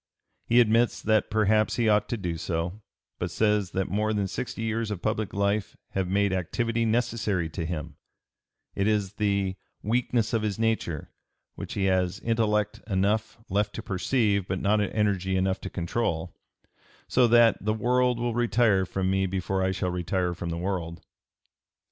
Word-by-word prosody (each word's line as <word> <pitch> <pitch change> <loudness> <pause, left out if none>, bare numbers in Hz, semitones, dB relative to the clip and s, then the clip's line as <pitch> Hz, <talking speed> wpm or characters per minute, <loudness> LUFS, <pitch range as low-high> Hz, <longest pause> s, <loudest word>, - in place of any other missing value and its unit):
He 120 - +5
admits 115 +1 +3
that 110 -1 +2
perhaps 110 0 +2
he 120 -2 +1
ought 105 -1 +3
to 120 - -1
do 90 -5 -3
so, 85 +5 -3 0.4
but - - -2
says 105 -3 +1
that 95 -1 0
more 105 +3 0
than 100 -2 0
sixty 115 +3 -4
years 110 0 -1
of 105 -4 -3
public 110 -1 -1
life 100 +1 -1
have 95 -1 -1
made 100 +1 +1
activity 115 +6 -1
necessary 110 -7 0
to 80 +1 -4
him; 80 -3 -5 0.8
it 100 - 0
is 105 -3 +1
the 100 -2 0 0.3
"weakness 120 +1 0
of 115 - +2
his 105 -3 -2
nature" 110 -9 -1 0.4
which - - -7
he 100 - 0
has 90 -1 +1
"intellect 105 -2 0
enough 105 +3 0
left 100 +2 0
to - - -5
perceive 100 0 +1
but 95 0 -2
not 105 +2 +2
energy 95 -2 0
to 95 0 -1
control," 85 -2 -2 0.7
so 125 -1 +4
that 115 -2 +5
"the 110 - +1
world 125 +2 +2
will 120 0 -1
retire 110 -5 +2
from 95 -1 -2
me 95 0 +1
before 95 +1 -1
I 95 - +2
shall 90 -1 -1
retire 90 0 -1
from 85 0 -5
the 85 - -3
world." 85 -2 -4
100 Hz, 165 wpm, -27 LUFS, 95-110 Hz, 0.8 s, He